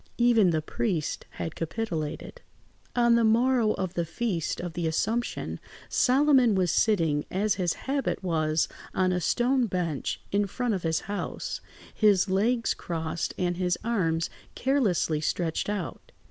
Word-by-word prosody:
Even 235 -5 +5
the 160 -2 0
priest 170 -4 -2
had 160 - -4
capitulated. 165 -3 -4 0.5
On 235 -1 +4
the 235 0 +4
morrow 230 0 +3
of 185 -2 -3
the 170 - 0
Feast 170 0 -2
of 175 -2 -5
the 175 -2 -1
Assumption, 225 +9 -1 0.3
Solomon 260 -4 +4
was 180 -3 +2
sitting, 165 -9 +2
as 205 +2 +1
his 175 -2 +1
habit 275 -6 -1
was, 160 -3 +1 0.3
on 185 -1 +2
a 180 0 0
stone 245 +7 +2
bench 175 -7 -2
in 200 0 +2
front 245 +3 -1
of 190 - -2
his 160 -1 0
house, 205 0 -4 0.3
his 205 -4 +4
legs 230 +5 +2
crossed 165 -1 -3
and 175 -1 0
his 180 -1 +1
arms 165 -8 0 0.2
carelessly 210 - +1
stretched 165 +3 -1
out. 205 -4 -5
190 Hz, 145 wpm, -27 LUFS, 165-235 Hz, 0.5 s, Even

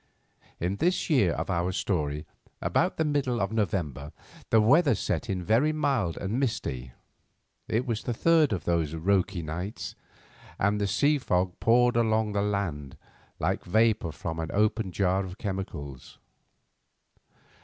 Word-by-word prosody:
In 90 +4 -1
this 180 - 0
year 105 - +4
of - - -3
our 85 +1 0
story, 75 -6 -2 0.3
about 165 - 0
the 160 - +1
middle 140 -5 0
of 100 0 -1
November, 85 - -2 0.4
the 115 - +5
weather 140 +5 +5
set 120 +4 -2
in 95 -2 -2
very 115 - +3
mild 140 - 0
and 100 +6 -2
misty. 65 - -3 0.7
It 115 +3 0
was 115 -4 -2
the 120 - -2
third 160 0 +4
of 90 -6 -2
these 80 -3 0
"roky" 90 +1 +1
nights, 90 +7 -5 0.6
and 105 +1 +1
the 100 - +1
sea 145 +8 +2
fog 90 -6 0
poured 120 +1 +4
along 110 -2 +2
the 100 -1 0
land 95 -10 -2 0.4
like - - -1
vapour 110 -3 +2
from 80 +2 -5
an 80 0 -3
opened 105 -2 0
jar 95 0 +2
of 95 0 -8
chemicals. 95 - -6
100 Hz, 145 wpm, -27 LUFS, 85-115 Hz, 0.7 s, the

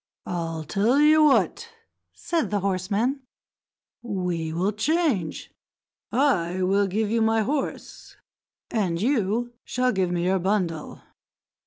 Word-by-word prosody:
"I'll 165 -2 -3
tell 215 - +1
you 305 +1 +6
what," 295 -3 +2 0.4
said 335 -2 -2
the 205 -2 -1
horseman, 200 +8 -1 0.8
"we 180 -7 -3
will 180 +5 0
change. 225 - -1 0.6
I 185 -9 +1
will 195 +2 +2
give 210 +2 -1
you 230 0 +1
my 225 0 +3
horse, 280 +4 -4 0.6
and 185 -7 0
you 235 0 0
shall 255 0 0
give 190 -4 0
me 175 -1 -1
your 190 +1 +2
bundle." 180 -4 -2
205 Hz, 120 wpm, -25 LUFS, 180-245 Hz, 0.8 s, you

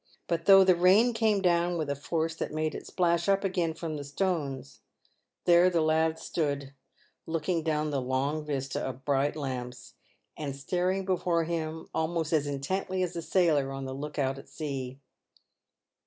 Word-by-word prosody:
But 170 -1 -1
though 195 -1 +9
the 185 -1 +5
rain 195 +8 +5
came 220 -3 +2
down 175 0 +2
with 155 -2 -2
a 140 - -1
force 160 +3 -2
that - - -4
made 155 0 -1
it - - -7
splash 170 0 +1
up 195 0 +3
again 180 -4 0
from 160 -2 -4
the 145 - -5
stones, 140 -4 -3 0.7
there 175 +1 +6
the 175 -2 +1
lad 160 0 +2
stood, 140 -5 -2 0.5
looking 165 +1 -1
down 155 -1 -1
the 140 -2 0
long 135 +4 -1
vista 140 -3 -3
of 130 0 -6
bright 140 +1 +1
lamps, 125 -4 -5 0.4
and 140 -3 -4
staring 180 +6 -1
before 180 -3 +1
him 160 -1 -4
almost 160 0 -1
as 150 -2 +2
intently 185 +7 -2
as 180 -1 -3
a 170 - -3
sailor 160 -5 +2
on 135 0 -5
the 130 - -5
look 150 +2 -6
out 135 -1 0
at - - -14
sea. 135 -4 -5
160 Hz, 170 wpm, -29 LUFS, 140-175 Hz, 0.7 s, though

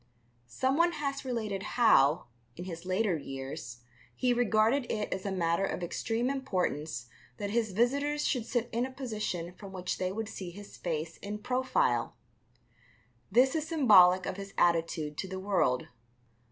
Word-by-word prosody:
Someone 275 - +2
has 280 -2 -3
related 220 -6 -2 0.2
how, 155 - +5 0.3
in 175 - -7
his 170 -1 -7
later 185 0 +1
years, 135 -3 -7 0.3
he 250 -1 +2
regarded 235 +2 +2
it 210 -1 -2
as 190 +1 -4
a - - -1
matter 170 -1 +1
of 190 - -2
extreme 225 +7 -1
importance 160 - -2 0.3
that 200 0 -3
his 225 -2 +1
visitors 280 +8 +1
should 245 -5 -1
sit 240 -1 0
in 235 +2 0
a 260 - -2
position 215 -9 -4
from 195 +1 -11
which 180 -1 -3
they 185 0 -1
would 220 +2 -3
see 190 -4 -6
his 200 +3 -11
face 165 -1 -3
in 205 +1 -5
profile. 245 - 0 1.2
This 250 +5 +5
is 315 -1 -1
symbolic 190 - +6
of 185 - -4
his 195 0 -8
attitude 165 -3 +1
to 190 - -2
the 190 0 -5
world. 185 -10 +1
200 Hz, 155 wpm, -30 LUFS, 175-245 Hz, 1.2 s, symbolic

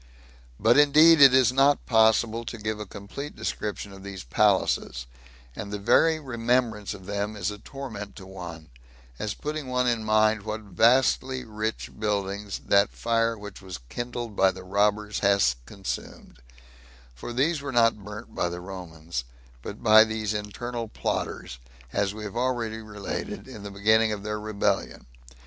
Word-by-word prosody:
But 115 +6 +5
indeed 155 +2 +7
it 135 -2 +10
is 130 -1 +4
not 140 +2 +3
possible 110 0 +3
to 115 - -6
give 110 0 -3
a 105 - -6
complete 105 +10 -8
description 105 -1 -4
of 95 - -12
these 100 -1 -7
palaces; - - +1 0.5
and 100 - -6
the 105 - -2
very 160 +10 +3
remembrance 120 -5 -1
of 95 -2 -13
them 100 +2 -3
is 100 -1 -2
a 105 - -9
torment 110 -6 -8
to 95 - -10
one, 85 -5 -9 0.5
as 105 -1 -3
putting 150 -2 -4
one 125 0 +1
in 115 -2 +1
mind 110 0 +3
what 110 +1 -4
vastly 125 +5 +2
rich 110 0 -4
buildings 100 -1 -2
that 100 +1 +4
fire 115 0 0
which 105 -2 -10
was 95 -2 -7
kindled 120 -2 -5
by 95 0 +5
the 95 - -7
robbers 105 +2 +1
hath 100 -10 +3
consumed; 100 -10 -7 0.7
for 60 - -8
these 140 +5 +1
were 140 -1 -4
not 115 -4 +3
burnt 105 +3 -9
by 85 - 0
the 85 0 -6
Romans, 85 -7 -6 0.4
but 100 - -8
by 110 -1 +8
these 110 -1 -2
internal 115 +3 -4
plotters, 65 - -4 0.3
as 100 -1 +1
we 105 +1 -8
have 105 +1 -6
already 120 -3 -1
related, 105 -2 -6
in 105 - -9
the 100 - -7
beginning 110 +3 +3
of 105 -2 -4
their 105 0 -3
rebellion. 105 -1 -1
105 Hz, 160 wpm, -26 LUFS, 100-120 Hz, 0.7 s, it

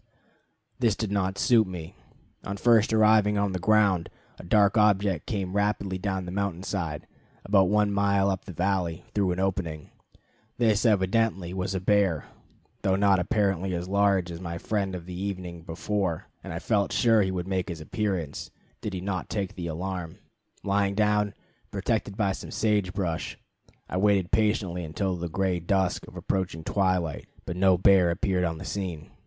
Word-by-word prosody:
This 115 -5 +2
did 110 -2 -3
not 95 -1 0
suit 115 -4 +4
me. 85 -3 -7 0.5
On 100 -1 -4
first 115 +1 +4
arriving 110 -1 +4
on 100 -1 +1
the 95 - -2
ground, 100 -3 +3 0.3
a - - -9
dark 100 +3 +3
object 100 -5 +2
came 95 -3 -3
rapidly 100 -2 0
down 95 -1 -2
the 90 - -6
mountain 95 -2 -2
side, 85 -7 -3 0.4
about 95 -2 +4
one 105 0 +3
mile 100 -1 +2
up 95 - -4
the - - -7
valley, 90 -1 -1
through 100 -3 +1
an 90 - -2
opening. 90 -5 -2 0.7
This 115 -1 +3
evidently 95 -2 +1
was 95 +1 -2
a - - 0
bear, 95 -4 +2 0.6
though 95 -1 +2
not 100 -1 +4
apparently 95 -1 0
as 85 +1 -4
large 100 -2 +2
as 85 +1 -7
my 85 -2 -4
friend 95 0 -2
of 85 -2 -7
the 90 - -8
evening 90 -2 -5
before; 85 +1 -2 0.2
and - - -7
I 85 - -4
felt 100 +2 0
sure 115 -2 +4
he 95 - +1
would 90 -1 -3
make 95 -1 -1
his 85 -2 -5
appearance 90 -2 -3 0.3
did 105 -3 -4
he 90 - -4
not 95 -1 -3
take 100 -2 -2
the 90 -4 -5
alarm. 90 0 -4 0.5
Lying 100 0 +1
down, 105 -1 +2 0.3
protected 100 -1 -2
by 100 -3 +2
some - - -6
sage 105 -4 +1
brush, 90 -4 -3 0.5
I 90 - -3
waited 100 -2 +2
patiently 105 -5 +1
until 90 +4 -2
the 85 0 -4
gray 95 +1 0
dusk 95 +2 0
of - - -13
approaching 90 -4 -2
twilight, 90 -5 0 0.2
but 90 - -4
no 95 0 +4
bear 95 -1 +5
appeared 90 +1 0
on 80 -1 -2
the 90 - -8
scene. 90 -7 -5
95 Hz, 175 wpm, -27 LUFS, 90-100 Hz, 0.7 s, bear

